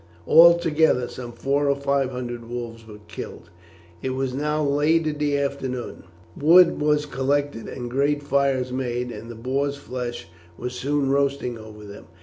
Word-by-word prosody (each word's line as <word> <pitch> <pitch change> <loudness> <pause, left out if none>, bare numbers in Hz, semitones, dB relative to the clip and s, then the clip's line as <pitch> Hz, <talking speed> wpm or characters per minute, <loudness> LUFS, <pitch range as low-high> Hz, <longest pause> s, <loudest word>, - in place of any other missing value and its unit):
Altogether 160 -6 +5
some 120 -1 -8
four 140 +4 0
or 140 - +3
five 140 -1 0
hundred 120 -2 -6
wolves 115 -2 -6
were 105 -1 -12
killed. - - -9 0.5
It 130 - -2
was 135 -1 -2
now 150 +3 -1
late 150 +3 +2
in 150 -1 -2
the 145 -1 +1
afternoon. 135 -5 -4 0.3
Wood 170 +3 +5
was 150 0 +2
collected 140 -2 -1
and 120 -2 -6
great 140 +4 0
fires 135 -2 +1
made, 125 -1 -2
and 115 - -9
the 120 - -8
boars' 135 +5 -2
flesh 125 -7 -6 0.3
was 125 0 -5
soon 140 +2 0
roasting 140 -3 0
over 105 -1 -11
them. 100 0 -11
135 Hz, 155 wpm, -23 LUFS, 125-145 Hz, 0.5 s, Altogether